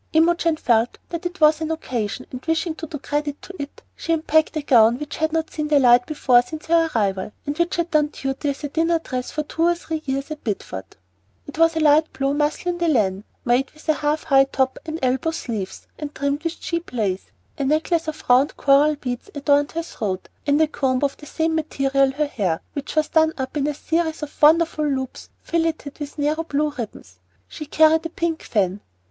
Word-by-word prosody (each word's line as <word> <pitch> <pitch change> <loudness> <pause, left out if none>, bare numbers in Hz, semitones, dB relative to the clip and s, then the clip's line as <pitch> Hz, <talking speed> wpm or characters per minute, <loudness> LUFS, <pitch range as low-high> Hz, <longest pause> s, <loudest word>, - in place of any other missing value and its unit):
Imogen 330 0 +3
felt 235 -4 +2
that 340 0 -3
it 355 +1 -11
was 305 0 +5
an 315 - -2
occasion, 255 -7 -3
and 255 0 -7
wishing 325 +1 0
to 320 +1 -7
do 295 - -5
credit 290 +1 -3
to 380 - -9
it, 280 - -8
she 330 - -4
unpacked 315 0 +2
a 305 - -2
gown 235 -4 +5
which 295 +2 -6
had 315 0 0
not 325 0 -1
seen 305 -1 -3
the 300 -1 +4
light 245 -2 +5
before 265 -5 +4
since 305 +6 -9
her 330 0 +3
arrival, 195 -3 0
and 290 - -2
which 340 +1 +1
had 345 0 -1
done 305 -2 +3
duty 275 0 -3
as 280 +2 -4
a 290 - -2
dinner 330 +3 +2
dress 255 -6 -4
for 305 - -3
two 320 - -6
or 345 +1 +4
three 320 -2 -5
years 275 +2 -3
at 305 - -6
Bideford. 95 - -5 0.5
It 290 +2 -9
was 330 0 +4
of 320 - +1
light 310 +1 +4
blue 275 +1 0
mousselaine 310 +4 -1
de 340 - +1
laine, 205 -8 +1 0.2
made 245 +3 +2
with 310 - -17
a - - +6
"half 300 +1 -1
high 270 -3 +5
top" 265 -1 -1
and 315 0 -3
elbow 260 +5 +1
sleeves, 225 -12 -5
and 295 -1 -6
trimmed 280 +2 -1
with 335 0 -3
cheap 335 0 -4
lace. 200 -6 -1 0.3
A - - 0
necklace 315 +3 +1
of 310 0 -5
round 255 +4 +4
coral 290 +2 +4
beads 250 +3 -5
adorned 285 +1 +2
her 335 +1 -2
throat, 200 - -4 0.2
and 285 +1 +3
a 315 - +4
comb 265 -3 0
of 280 -1 +1
the 295 - -12
same 320 +2 0
material 275 -3 +1
her 300 +2 0
hair, 195 - -1
which 285 +1 -5
was 310 -1 +2
done 320 0 +3
up 260 +1 -4
in 290 -1 0
a 300 - -1
series 320 0 -1
of 295 - -9
wonderful 315 0 +5
loops 265 -3 -3
filleted 325 -3 -2
with 290 0 -7
narrow 300 +2 0
blue 300 -1 0
ribbons. 210 - -8 0.3
She 305 - -8
carried 315 +1 +4
a 330 - -4
pink 330 0 -2
fan. 200 -2 0
295 Hz, 215 wpm, -22 LUFS, 265-320 Hz, 0.5 s, a